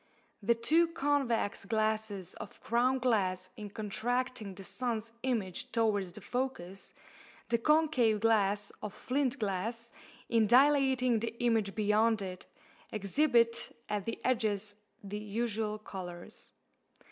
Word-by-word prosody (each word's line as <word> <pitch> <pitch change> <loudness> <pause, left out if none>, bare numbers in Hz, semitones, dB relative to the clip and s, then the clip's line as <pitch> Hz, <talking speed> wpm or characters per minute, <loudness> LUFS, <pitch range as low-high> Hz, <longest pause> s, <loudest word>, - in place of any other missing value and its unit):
The 235 +4 +3
two 315 +9 +3
convex 285 -10 0
glasses 215 -3 -1
of - - -10
crown 245 +3 +2
glass 190 -7 +1
in 210 -1 -7
contracting 220 +1 -2
the 195 - -9
sun's 230 +1 -2
image 220 -9 -2
towards 210 -5 +1
the - - -9
focus, 195 -8 -3 0.5
the 235 0 +2
concave 280 -6 +3
glass 205 -2 +2
of 210 - -6
flint 270 0 0
glass 225 +3 -2 0.4
in 225 -2 +3
dilating 260 -1 +4
the 225 +1 -3
image 225 -5 +1
beyond 215 0 +3
it, 185 -1 -7 0.4
exhibit 230 +3 +2
at 210 -2 -1
the 230 - -3
edges 215 -4 +1 0.3
the 205 +1 -5
usual 215 0 -2
colours. 180 -4 -8
225 Hz, 120 wpm, -32 LUFS, 205-245 Hz, 0.5 s, dilating